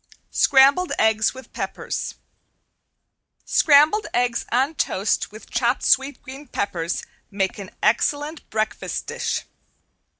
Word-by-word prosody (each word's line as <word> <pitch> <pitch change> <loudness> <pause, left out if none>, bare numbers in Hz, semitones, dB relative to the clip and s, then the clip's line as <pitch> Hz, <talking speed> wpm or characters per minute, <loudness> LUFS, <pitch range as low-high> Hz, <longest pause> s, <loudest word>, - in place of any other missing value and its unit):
~SCRAMBLED 280 +6 +4
EGGS 220 +2 +2
WITH 260 -2 -12
PEPPERS~ - - -4 1.3
Scrambled 310 +8 +4
eggs 245 -1 0
on 265 +6 +2
toast 200 -10 -1
with 215 +1 -12
chopped 240 +1 0
sweet 270 +2 +2
green 275 +2 -10
peppers 175 -7 -3 0.3
make 195 -1 -2
an 195 -2 -7
excellent 290 +7 0
breakfast 215 -1 -3
dish. - - -3
245 Hz, 105 wpm, -22 LUFS, 215-285 Hz, 1.3 s, ~SCRAMBLED